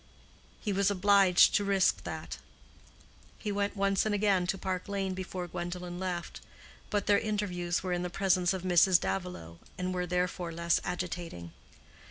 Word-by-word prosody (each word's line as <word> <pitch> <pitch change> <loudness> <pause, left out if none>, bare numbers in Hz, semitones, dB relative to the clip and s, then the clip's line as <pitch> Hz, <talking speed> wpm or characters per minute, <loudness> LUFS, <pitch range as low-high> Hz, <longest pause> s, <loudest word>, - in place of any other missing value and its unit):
He 210 - -2
was 200 +1 +2
obliged 200 -2 +5
to 205 - +3
risk 195 -2 +2
that. - - -6 1.0
He 210 - -4
went 200 0 -1
once 195 0 +2
and 215 -1 0
again 195 -3 +2
to 195 - 0
Park 185 0 -3
Lane 195 -2 -2
before 185 -1 -5
Gwendolen 175 +1 -5
left; 180 -2 -4 0.5
but 205 -2 0
their 205 -1 +4
interviews 180 -5 -2
were 185 -1 -1
in 175 - -1
the 180 - -3
presence 180 -1 +2
of 190 -2 -3
Mrs. 180 0 +5
Davilow, 85 - -4 0.2
and 185 0 -2
were 180 -1 -2
therefore 180 -1 -1
less 170 +1 +1
agitating. 175 - -5
185 Hz, 160 wpm, -30 LUFS, 175-200 Hz, 1.0 s, obliged